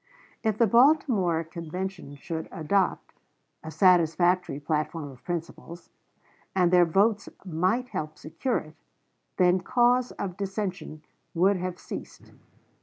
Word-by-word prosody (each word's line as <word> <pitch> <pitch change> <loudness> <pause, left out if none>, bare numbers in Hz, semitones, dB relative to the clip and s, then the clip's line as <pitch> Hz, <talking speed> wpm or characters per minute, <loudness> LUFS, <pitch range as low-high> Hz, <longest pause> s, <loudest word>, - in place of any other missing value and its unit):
If 220 -2 0
the 230 - +5
Baltimore 230 - +3
Convention 170 -1 -6
should 160 +3 -5
adopt 180 +4 -1 0.5
"a 160 - -7
satisfactory 175 -2 +3
platform 150 0 -2
of 130 - -17
principles," 170 0 -6 0.6
and 180 -2 +3
their 175 -1 +6
votes 200 +6 +1 0.2
might 185 +9 0
help 155 0 -5
secure 240 +11 -2
it, 155 0 -8 0.6
then 180 0 +4
cause 245 +4 +2
of 190 -2 -5
dissension 190 -5 -4 0.3
would 190 +3 +3
have 180 0 -4
ceased. - - -9
180 Hz, 115 wpm, -27 LUFS, 160-200 Hz, 0.6 s, their